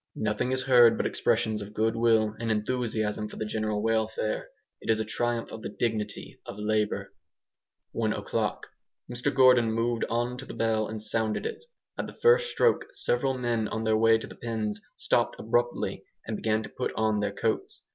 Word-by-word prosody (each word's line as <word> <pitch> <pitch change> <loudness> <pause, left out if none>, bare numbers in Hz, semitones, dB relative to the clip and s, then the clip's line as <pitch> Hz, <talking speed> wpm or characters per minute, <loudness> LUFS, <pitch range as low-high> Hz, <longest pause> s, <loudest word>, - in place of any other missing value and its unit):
Nothing 110 +4 -1
is 130 0 0
heard 120 -3 +6
but - - -1
expressions 110 -1 +1
of 105 +1 -9
goodwill 110 -1 +2
and 115 0 -2
enthusiasm 110 -1 -1
for - - -10
the 110 - -3
general 110 -1 -1
welfare. 110 -1 -1 0.3
It - - -8
is 110 -1 +3
a 110 - -1
triumph 120 +1 -1
of 110 - -7
the - - -5
dignity 105 -1 -3
of - - -7
labour. 105 0 -1 0.8
One - - 0
o'clock. - - -2 0.4
Mr 125 +3 -1
Gordon 125 -4 +5
moved 115 +1 0
on 120 +2 -1
to 135 - -7
the - - -7
bell 110 -1 +1
and 110 0 -5
sounded 110 0 -1
it. 460 - -5 0.4
At - - -2
the - - -12
first 480 +1 +5
stroke 475 - +2
several 130 - 0
men 120 -3 0
on 110 +1 -3
their 110 -1 +2
way 115 +1 +5
to 110 - -7
the - - -11
pens 110 -2 -3 0.2
stopped - - +1
abruptly 120 +2 -1 0.2
and 110 - -3
began 110 0 0
to - - -8
put 130 - -3
on 110 -1 +1
their 105 -1 0
coats. 110 +2 -2
110 Hz, 185 wpm, -28 LUFS, 110-120 Hz, 0.8 s, heard